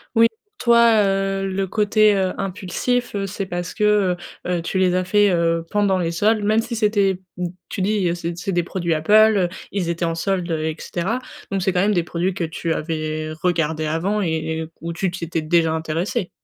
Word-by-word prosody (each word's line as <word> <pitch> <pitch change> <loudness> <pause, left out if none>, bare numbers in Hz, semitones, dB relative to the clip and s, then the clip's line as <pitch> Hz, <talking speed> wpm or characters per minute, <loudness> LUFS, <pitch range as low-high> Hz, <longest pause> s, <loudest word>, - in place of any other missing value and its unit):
Oui, 230 0 +7 0.3
toi, 235 -2 +5
heu, 195 0 0
le 190 0 -1
côté 210 +1 +3
heu 190 -1 +1
impulsif, 200 +6 -2
heu, 195 0 -1
c'est 195 0 -4
parce 175 -1 -4
que 210 - -2
heu, 200 -4 +3 0.3
heu, 180 -1 0
tu 180 +3 -3
les 180 -1 +3
as 185 - +1
faits, 205 +2 +3
heu, 165 -1 +1
pendant 200 -3 +2
les 170 -1 -1
soldes, 210 +5 +2
même 215 +2 +2
si 230 0 -5
c'était 200 -4 +2 0.2
m 180 -1 -1 0.2
tu 190 - -4
dis: 190 -3 +1
«C'est 170 0 -5
c'est 195 +1 -3
des 175 -1 +1
produits 170 -2 -2
Apple 155 +5 -2 0.2
heu, 180 -3 +2 0.2
ils 185 -4 -1
étaient 170 0 -1
en 165 0 -1
soldes 180 0 -1
heu» 155 -1 -1
et 155 - -2
cetera. 195 +8 -2 0.3
Donc 195 - 0
c'est 185 +1 +1
quand 180 - +2
même 210 +1 +2
des 175 - +1
produits 175 +2 -1
que 175 -3 -2
tu 165 +1 -3
avais 155 -1 -3
regardés 160 -3 0
avant 190 +7 0
et 175 - 0 0.3
et 160 - -3
où 170 +1 -5
tu 180 +1 -1
t'étais 170 -2 -3
déjà 165 0 +2
intéressé. 165 +3 -2
185 Hz, 210 wpm, -21 LUFS, 170-200 Hz, 0.3 s, Oui